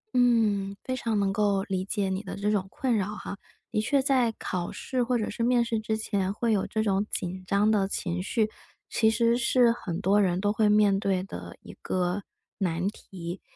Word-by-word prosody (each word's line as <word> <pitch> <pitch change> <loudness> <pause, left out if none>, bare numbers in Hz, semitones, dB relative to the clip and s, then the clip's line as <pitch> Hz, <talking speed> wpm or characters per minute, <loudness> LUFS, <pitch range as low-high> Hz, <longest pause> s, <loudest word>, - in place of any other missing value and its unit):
嗯， 220 -5 +3
非 255 - -2
常 225 -4 -1
能 195 -1 +1
够 200 -1 +2
理 190 -2 -2
解 200 -1 -1
你 190 +1 -2
的 195 - -7
这 205 +1 0
种 195 -2 0
困 250 +1 0
扰 210 +1 -1
哈， 200 - -6 0.4
的 215 - +1
确 275 +5 +2
在 260 -4 +2
考 180 -3 -3
试 255 -2 -2
或 245 0 +1
者 215 - -1
是 235 - -5
面 240 0 +3
试 230 -1 -1
之 220 0 -1
前 200 -3 -1
会 225 +1 0
有 195 - 0
这 220 - -1
种 200 0 +1
紧 185 +1 -4
张 205 +3 +3
的 195 -3 +2
情 180 -2 -3
绪， 215 +3 +1 0.4
其 220 -1 +3
实 230 +1 +3
是 245 0 +4
很 180 -6 -4
多 200 +2 +4
人 180 -2 +1
都 205 +1 +1
会 215 -1 +3
面 210 -2 +4
对 190 -2 0
的 195 - -8
一 - - -11
个 180 +2 -1 0.4
难 175 0 0
题， 180 -4 -8
205 Hz, 220 characters per minute, -27 LUFS, 195-230 Hz, 0.4 s, 是